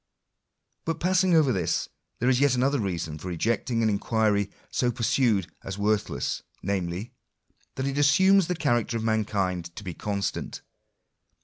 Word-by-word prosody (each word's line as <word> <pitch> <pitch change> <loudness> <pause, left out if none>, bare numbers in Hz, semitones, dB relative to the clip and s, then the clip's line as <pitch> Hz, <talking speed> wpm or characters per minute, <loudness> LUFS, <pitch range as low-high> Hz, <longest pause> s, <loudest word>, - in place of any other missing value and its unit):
But 165 -1 -2
passing 185 0 +3
over 150 -5 +4
this, 90 -5 0 0.3
there 125 - -1
is 125 -1 +4
yet 140 -2 +4
another 135 +3 +2
reason 85 -7 -3
for 90 - -8
rejecting 115 +6 0
an 110 - +3
inquiry 105 -1 +1 0.2
so 125 - +1
pursued 115 -5 +1
as 95 0 -5
worthless; 105 0 -1 0.2
namely, 95 +3 -2 0.6
that 130 - -2
it 140 +1 -1
assumes 190 +6 +5
the 180 - -1
character 120 -6 0
of 110 - -4
mankind 95 -6 -1
to - - -8
he 90 -3 -5
constant. 100 +2 -3
110 Hz, 145 wpm, -26 LUFS, 100-135 Hz, 0.6 s, assumes